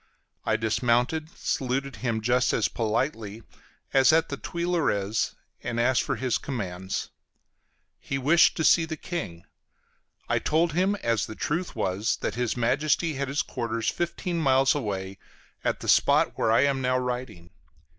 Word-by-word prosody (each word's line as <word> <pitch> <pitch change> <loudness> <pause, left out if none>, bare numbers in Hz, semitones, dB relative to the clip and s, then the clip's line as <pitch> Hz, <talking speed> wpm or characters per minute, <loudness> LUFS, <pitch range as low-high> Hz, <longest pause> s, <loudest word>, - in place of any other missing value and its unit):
I - - +3
dismounted, 120 +7 +1
saluted 135 0 -2
him 115 0 -2
just 125 +3 +2
as - - +2
politely 115 -1 -2 0.5
as 135 +1 +6
at 160 +1 +3
the 140 - -4
Tuileries, 155 - -1 0.3
and 115 -1 -3
asked 125 +1 +3
for - - -2
his 130 -2 -1
commands. 95 -8 -4 0.9
He 135 - -3
wished 150 +6 +4
to 160 - 0
see 165 +1 +5
the 160 -1 -5
King; 90 - -5 0.8
I - - +1
told 165 +1 +1
him, 190 +4 +2
as 115 -3 +1
the 110 - -8
truth 170 +9 -2
was, 105 +1 0
that - - -2
his 125 0 -1
Majesty 150 +7 +1
had 140 0 -3
his 140 +3 0
quarters 115 -3 -2
fifteen 175 0 -2
miles 135 -3 +4
away, 95 -7 -4 0.4
at - - -1
the - - -6
spot - - +4
where 110 - +1
I 115 - +5
am 140 -1 +1
now 130 0 +1
writing. 125 -9 -4
125 Hz, 155 wpm, -26 LUFS, 110-150 Hz, 0.9 s, as